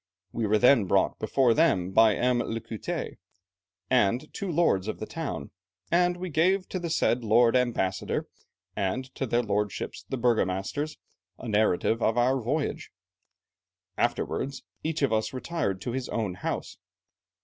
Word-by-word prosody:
We 115 -2 -1
were 110 +1 +3
then 125 -1 +5
brought - - +1
before 130 -4 +3
them 95 - +2
by 110 +1 +5
M. 125 0 +2
l'Écoutets 115 -2 -4 0.7
and 125 +4 +1
two 200 -3 -4
lords 150 - +2
of 110 - -3
the - - -5
town, 125 - -5 0.4
and 175 +1 +3
we 180 -1 -5
gave 185 +5 +2
to 185 - -3
the 170 -1 -4
said 125 -6 +1
lord 115 +2 +4
Ambassador, 115 -7 0 0.5
and 125 +7 -2
to 135 - -3
their 120 +1 +1
lordships 105 -1 -2
the 135 - -2
burgomasters, 120 +5 0 0.4
a - - -8
narrative 110 +1 +2
of 115 +1 +1
our 130 +2 +2
voyage. 145 +6 -2 1.1
Afterwards 135 0 -1 0.2
each 160 -2 -1
of 135 - +2
us 110 +3 0
retired 130 - -2
to 120 - -3
his 130 +1 -4
own 110 -5 -2
house. 90 - -4
120 Hz, 150 wpm, -27 LUFS, 110-145 Hz, 1.1 s, then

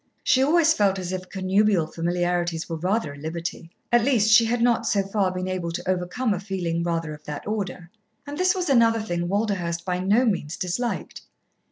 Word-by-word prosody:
She 260 - +3
always 320 +3 +4
felt 200 -5 +2
as 185 -1 -4
if 185 0 -5
connubial 190 -1 +2
familiarities 175 0 -1
were 165 - -4
rather 180 -2 -1
a - - -12
liberty; 165 +2 -5 0.2
at 240 -1 +4
least 225 -5 +3
she 230 +1 +7
had 235 +2 0
not, 235 -1 +2
so 200 -2 +2
far, 195 -1 0
been 185 0 -4
able 185 -2 -3
to - - -5
overcome 185 +6 0
a 185 - -3
feeling 180 -4 -2
rather 165 -2 -2
of 150 0 -12
that 150 -1 -6
order. 190 -5 -4 0.3
And 290 0 -6
this 365 +3 +2
was 365 -1 -2
another 230 -4 +4
thing 175 -5 -2
Walderhurst 185 -5 -1
by 180 -1 -1
no 205 +7 +3
means 180 -8 -1
disliked. 230 +7 -3
185 Hz, 195 wpm, -24 LUFS, 175-225 Hz, 0.3 s, she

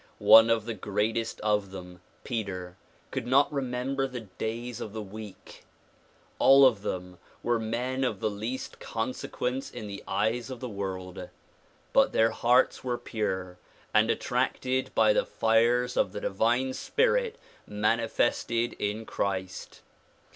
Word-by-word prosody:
One 115 +1 +8
of 115 -2 +2
the 115 - -3
greatest 110 +3 -2
of 105 -2 +1
them, 90 -2 -10 0.2
Peter, 95 -7 -4 0.4
could 130 -3 -3
not 140 +4 +4
remember 135 0 -1
the 125 -2 -6
days 115 +3 -5
of 105 - -6
the 110 - -4
week. 105 0 -11 0.8
All 135 0 +8
of 115 -6 +3
them 90 -3 -5 0.2
were 120 -1 +1
men 125 +4 -2
of 130 - -1
the 110 - 0
least 110 +6 -5
consequence 125 +2 -3
in - - -8
the 100 -1 -7
eyes 110 +6 0
of 130 -2 -6
the 125 - -5
world. 95 -3 -5 0.6
But - - +4
their 115 0 +4
hearts 125 +2 +2
were 125 -2 -1
pure 95 -6 -3 0.3
and 110 +1 +4
attracted 130 +2 0
by - - +5
the - - +2
fires 120 - +2
of 95 - +1
the 105 - -4
divine 120 +6 +1
spirit 480 - +1 0.3
manifested 115 +2 0
in 105 +2 -2
Christ. 95 -4 -4
115 Hz, 140 wpm, -28 LUFS, 100-125 Hz, 0.8 s, One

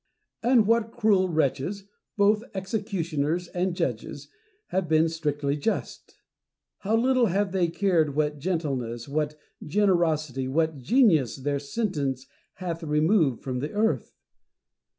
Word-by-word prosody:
And 235 -2 +4
what 230 +1 +2
cruel 210 -6 +2
wretches, 160 +5 -1 0.3
both 210 +1 +4
execu 195 0 -2
tioners 165 +2 -1
and 180 0 -1
judges, - - -3 0.4
have 185 -3 -1
been 160 +1 +4
strictly 145 -3 -1
just! 150 +10 -4 0.6
how 210 +3 0
little 255 0 +3
have 195 +1 0
they 185 -2 +1
cared 165 -5 +1
what 150 -1 0
gentleness, 135 -9 -2
what 150 +1 -2 0.3
generosity, 155 -8 +1
what 160 +2 0
genius, 160 - +3
their 140 +1 -2
sentence 140 - -2 0.3
hath 170 -2 -5
removed 155 - +2
from 130 -2 -3
the 145 +4 -4
earth 220 +2 0
165 Hz, 125 wpm, -26 LUFS, 145-200 Hz, 0.6 s, And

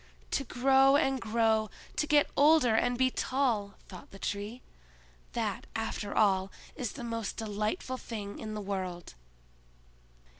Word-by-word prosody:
"To 275 - +1
grow 270 +2 +4
and 270 -3 +2
grow, 220 -1 +2 0.3
to 300 - +1
get 295 -1 +4
older 290 -5 +5
and 245 +2 +2
be 260 0 +3
tall," 235 -9 0
thought 185 - -11
the 195 - -12
Tree—"that, - - -6
after 205 - -3
all, 195 -2 +3 0.2
is 250 -7 -4
the 260 - -7
most 230 -2 -3
delightful 215 +4 -2
thing 205 -3 -6
in 215 -1 -5
the 210 - -4
world!" 185 -3 -4
220 Hz, 135 wpm, -30 LUFS, 200-255 Hz, 0.3 s, older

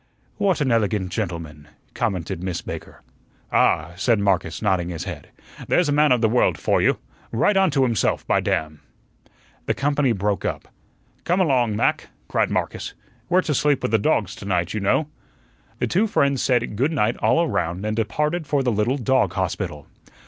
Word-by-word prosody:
"What 195 -6 +1
an 135 -3 +1
elegant 105 -4 0
gentleman," 85 -8 -5 0.3
commented 100 -9 -2
Miss 90 -2 -3
Baker. - - -8 0.5
"Ah," 75 +2 +2
said 115 +4 +2
Marcus, 95 -5 0
nodding 95 -5 0
his 85 -1 -5
head, 90 -7 -7 0.4
"there's 175 -4 +2
a - - +2
man 150 0 +4
of 125 -2 +3
the 110 - +4
world 120 +3 +2
for - - +1
you. - - +3 0.3
Right 195 - +2
on 195 -1 +4
to 140 -2 +2
himself, 115 -6 0
by - - +2
damn!" 75 -1 -2 0.9
The - - +1
company 140 -2 +1
broke 100 -1 -1
up. - - -3 0.6
"Come 180 +2 +1
along, 125 - +2
Mac," - - 0 0.2
cried - - +1
Marcus; - - -3 0.3
"we're 185 +1 +4
to 155 - -1
sleep 145 0 +1
with - - -1
the 110 - +3
dogs 105 - +1
to - - -9
night, 90 -2 0
you 110 - -1
know." 105 +10 +1 0.7
The - - 0
two 210 +5 +1
friends 140 - +1
said 120 -4 +1
"Good 135 +9 +1
night" 115 -6 +1
all 170 - +2
around 90 - -2
and 110 0 -1
departed 150 +9 -1
for 140 -2 +1
the 125 - +1
little 110 +5 +1
dog 130 -7 +1
hospital. 90 -6 -3
115 Hz, 180 wpm, -22 LUFS, 95-140 Hz, 0.9 s, man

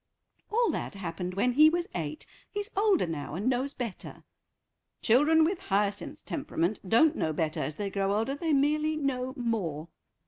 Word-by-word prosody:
"All 470 +2 +3
that - - -4
happened 180 -1 -5
when 225 +6 +2
he 305 +5 +7
was 345 +2 -1
eight; 155 -3 -4 0.2
he's 410 +1 -3
older 400 - +3
now 155 -2 -5
and 200 +7 -2
knows 260 +2 0
better." 235 -6 -6 0.8
"Children 300 +7 +5
with 350 +3 0
Hyacinth's 205 - -1
temperament 215 - -2
don't 295 +9 +5
know 160 - 0
better 155 0 -1
as 155 - -3
they 200 +2 -3
grow 195 0 0
older; 225 +6 0
they 320 +3 -2
merely 300 +2 +2
know 260 -3 -2
more." 180 - -2
245 Hz, 165 wpm, -29 LUFS, 190-305 Hz, 0.8 s, he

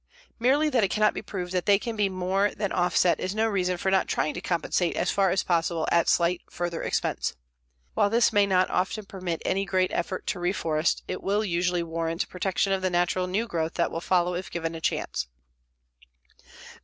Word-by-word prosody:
Merely 275 +6 +3
that 240 -5 +3
it 195 - +2
cannot 215 +1 +2
be - - -5
proved 180 -3 -5
that 180 -1 -1
they 200 -1 +6
can 230 +2 -5
be 205 -2 +1
more 190 +2 +1
than 205 -2 -2
offset 175 0 +2
is 185 +2 -3
no 220 +1 +2
reason 185 -4 0
for 190 +2 -1
not 190 - +2
trying 155 - 0
to 175 - -6
compensate 175 0 0
as - - +1
far 195 -1 +2
as 185 +2 +1
possible 165 -2 0
at 170 0 +3
slight 175 0 +2
further 175 -1 -3
expense. - - -1 0.6
While 205 - +2
this 230 +1 +3
may 205 -1 +4
not 185 -1 +2
often 190 +3 -1
permit 180 -4 -5
any 195 +1 +1
great 185 -1 +1
effort 185 +2 -2
to 185 - -2
reforest, 165 -3 0
it - - -4
will 205 +2 0
usually 175 -1 0
warrant 165 0 -2
protection 190 +1 0
of 190 - -1
the 185 - +1
natural 180 +1 +1
new 200 +5 0
growth 165 -6 -2
that 170 - 0
will 165 - -4
follow 180 -1 +1
if 180 +1 -4
given 165 -1 -3
a 165 - -7
chance. 65 - -2
185 Hz, 205 wpm, -26 LUFS, 175-195 Hz, 0.6 s, they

